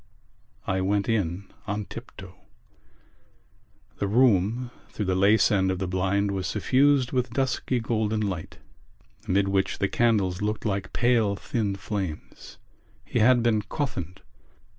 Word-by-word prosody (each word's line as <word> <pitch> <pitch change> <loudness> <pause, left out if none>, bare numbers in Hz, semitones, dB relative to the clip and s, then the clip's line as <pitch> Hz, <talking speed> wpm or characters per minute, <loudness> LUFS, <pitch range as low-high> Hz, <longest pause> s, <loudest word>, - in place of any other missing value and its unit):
I 95 0 0
went 100 +1 0
in 100 -4 -1 0.2
on 105 0 -2
tiptoe. - - -10 1.7
The 100 - 0
room 115 +1 +2 0.2
through 105 - -4
the 95 - +1
lace 100 +3 +4
end 95 -2 +2
of 95 - -1
the 95 - -2
blind 95 +2 0
was 95 -1 -2
suffused 135 -1 +2
with 125 -1 0
dusky 130 0 -1
golden 110 -1 -1
light 95 -6 -4 0.7
amid 100 +1 +2
which 95 0 0
the 100 - +1
candles 100 -6 +1
looked 105 +2 -2
like 100 -2 -2
pale 120 -4 +2
thin 105 -1 -2
flames. 95 -4 -6 0.5
He - - -1
had 120 +1 +5
been 110 -3 +2
coffined. 100 - -4
105 Hz, 135 wpm, -26 LUFS, 95-120 Hz, 1.7 s, had